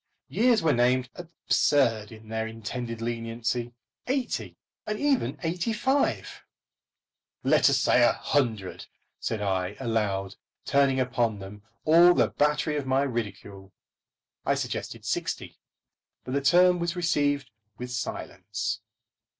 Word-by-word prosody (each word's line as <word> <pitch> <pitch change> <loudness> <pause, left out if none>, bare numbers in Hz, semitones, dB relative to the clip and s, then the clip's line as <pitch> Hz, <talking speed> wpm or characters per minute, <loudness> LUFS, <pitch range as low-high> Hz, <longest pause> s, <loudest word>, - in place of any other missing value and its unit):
Years 235 -3 +3
were 160 -3 +4
named 125 +1 +2
absurd 140 -9 +1
in 110 0 -13
their 110 0 -2
intended 115 +1 -5
leniency; 115 +1 -3 0.3
eighty 260 -1 -2 0.3
and 215 0 -2
even 285 -3 +1
eighty 175 +6 -1
five! 265 +6 0 1.0
Let - - +5
us - - +3
say - - +4
a - - +5
hundred, 110 -10 -1 0.3
said 110 -2 -2
I, 95 0 -1
aloud, 105 -6 -1 0.3
turning 140 -1 +3
upon 120 -4 0
them 100 +1 -10 0.2
all 170 +3 +7
the - - +3
battery 150 +1 +1
of 140 -2 -3
my 135 +1 +2
ridicule. 100 -6 -5 0.7
I - - +2
suggested - - -4
sixty; - - -3 0.6
but 130 - -6
the 140 - +1
term 180 +5 +5
was 170 +1 -1
received 145 -5 0 0.3
with 125 0 -6
silence. 105 -2 -4
125 Hz, 125 wpm, -27 LUFS, 110-155 Hz, 1.0 s, all